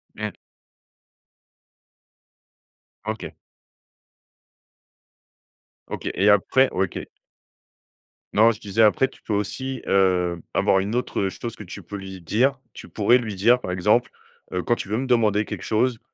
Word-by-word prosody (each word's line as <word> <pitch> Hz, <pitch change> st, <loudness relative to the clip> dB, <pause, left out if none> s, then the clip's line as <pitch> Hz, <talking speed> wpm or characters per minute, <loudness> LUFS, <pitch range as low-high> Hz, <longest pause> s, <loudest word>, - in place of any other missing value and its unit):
Mmh. -, -, -4 dB, 2.7 s
OK. 110 Hz, 0 st, -5 dB, 2.6 s
OK -, -, -4 dB
et 100 Hz, +3 st, +3 dB
après 115 Hz, +6 st, +4 dB
OK. 95 Hz, -1 st, -2 dB, 1.3 s
Non, 110 Hz, +2 st, +6 dB
je 110 Hz, -, -8 dB
disais 105 Hz, +1 st, -1 dB
après 110 Hz, +5 st, +4 dB
tu -, -, -20 dB
peux 105 Hz, -, -4 dB
aussi, 130 Hz, +6 st, -3 dB
heu, 90 Hz, -3 st, +2 dB
avoir 95 Hz, -, +3 dB
une 100 Hz, +5 st, -2 dB
autre, 125 Hz, -, -2 dB
heu, 95 Hz, -, +1 dB
chose 115 Hz, +4 st, -7 dB
que -, -, -9 dB
tu 90 Hz, -, -9 dB
peux 100 Hz, -, -7 dB
lui 95 Hz, -1 st, -8 dB
dire. 130 Hz, -, +1 dB
Tu -, -, -11 dB
pourrais 120 Hz, +4 st, +3 dB
lui 110 Hz, -4 st, -5 dB
dire 120 Hz, +6 st, +4 dB
par -, -, -5 dB
exemple, 105 Hz, +7 st, +2 dB, 0.4 s
heu,: 90 Hz, -1 st, -1 dB
«Quand 120 Hz, -, +2 dB
tu 105 Hz, -, -6 dB
veux 110 Hz, -, 0 dB
me 135 Hz, -, -2 dB
demander 110 Hz, -4 st, +2 dB
quelque -, -, -6 dB
chose, 115 Hz, +1 st, +1 dB
105 Hz, 140 wpm, -23 LUFS, 95-120 Hz, 2.7 s, Non